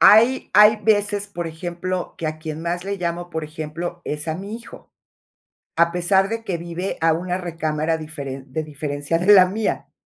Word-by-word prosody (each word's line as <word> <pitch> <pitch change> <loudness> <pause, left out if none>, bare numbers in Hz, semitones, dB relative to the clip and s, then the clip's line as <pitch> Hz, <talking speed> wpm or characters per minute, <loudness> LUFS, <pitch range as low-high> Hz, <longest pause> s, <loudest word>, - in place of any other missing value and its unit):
hay, 235 +5 +6
hay 210 +1 +8
veces, 205 -1 +1
por 175 -4 -4
ejemplo, 175 +2 -4
que 160 - -3
a 155 0 -3
quien 155 0 -5
más 175 +2 -2
le 200 0 -2
llamo, 175 0 -3
por 160 -1 -3
ejemplo, 160 +3 -6
es 150 +2 -4
a 160 - 0
mi 200 +5 -6
hijo. 230 0 -11 0.8
A 170 0 +4
pesar 190 +2 +3
de 225 0 -4
que 180 -5 -2
vive 170 +3 -4
a 165 0 +4
una 180 +2 -2
recámara 160 -2 -1
diferen 140 -4 -7
de 155 +1 -2
diferencia 145 +1 -2
de 190 +4 +5
la 185 -2 +9
mía. 210 +4 -2
170 Hz, 185 wpm, -22 LUFS, 155-195 Hz, 0.8 s, la